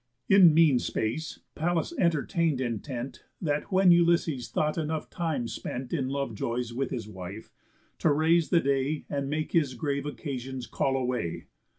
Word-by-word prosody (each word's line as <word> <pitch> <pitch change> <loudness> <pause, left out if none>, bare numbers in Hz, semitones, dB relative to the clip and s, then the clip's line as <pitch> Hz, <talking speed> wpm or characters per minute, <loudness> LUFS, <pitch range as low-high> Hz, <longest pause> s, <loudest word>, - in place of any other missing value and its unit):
In 190 -4 +8
mean 155 -6 +5
space 150 +11 -3
Pallas 175 - -1
entertain'd 165 - +1
intent 120 +1 -4 0.2
That 150 +3 -2
when 190 -1 +5
Ulysses 170 -6 +3
thought 155 0 0
enough 160 -1 -3
time 160 -8 -2
spent 125 +2 -5
In 135 -6 0
love 140 -3 -2
joys 120 +2 -3
with 135 +3 -2
his 115 -5 -4
wife, 95 +1 -8 0.5
to 160 - +3
raise 160 +2 +3
the 170 -2 +4
day, 140 +2 0
And 140 -1 -2
make 155 +1 -2
his 145 -6 +2
grave 140 +2 -2
occasions 130 -4 -5
call 135 +2 0
away. 125 -10 -2
140 Hz, 155 wpm, -28 LUFS, 125-160 Hz, 0.5 s, In